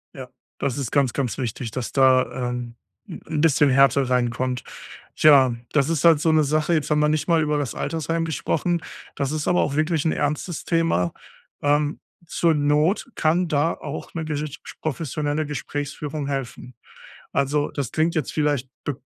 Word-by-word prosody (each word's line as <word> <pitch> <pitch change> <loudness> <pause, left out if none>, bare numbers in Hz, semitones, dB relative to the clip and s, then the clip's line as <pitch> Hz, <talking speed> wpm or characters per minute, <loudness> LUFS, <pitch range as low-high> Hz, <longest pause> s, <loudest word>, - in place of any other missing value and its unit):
Ja, 130 -2 -8 0.3
das 140 0 -1
ist 135 -5 -3
ganz, 140 -4 +2
ganz 130 -6 -2
wichtig, 115 -2 -4
dass 125 -1 -4
da, 130 -2 +3
ähm, 120 -1 -5 0.3
'n 160 -4 -4
bisschen 150 -3 +4
Härte 135 0 +4
reinkommt. 125 0 0 0.5
Tja, 135 -5 +6 0.2
das 140 0 +2
ist 165 -2 0
halt 165 -3 +7
so 160 0 +2
'ne 155 -1 +4
Sache, 155 +3 +1
jetzt 155 -2 0
haben 150 0 +2
wir 150 0 +3
nicht 155 +2 0
mal 165 -2 +3
über 150 -1 0
das 140 -5 -3
Altersheim 165 +1 -2
gesprochen, 165 +2 -1 0.3
das 140 0 -2
ist 155 -1 -2
aber 180 - +3
auch 140 0 -1
wirklich 155 0 0
'n 160 - +3
ernstes 150 +3 -2
Thema. 165 - +1 0.5
Ähm, 145 +1 +1 0.3
zur 165 -1 +2
Not 150 - +1
kann 170 +3 +2
da 155 +2 +1
auch 145 0 -7
ne 160 -2 -4
gesitsch 150 -1 -4 0.2
professionelle 155 0 -2
Gesprächsführung 145 0 -4
helfen. 130 -3 -5 0.6
Also, 145 +1 0
das 140 -6 -4
klingt 160 +2 +1
jetzt 155 - -1
vielleicht 145 -4 0
b 145 - -2
145 Hz, 170 wpm, -23 LUFS, 135-155 Hz, 0.6 s, halt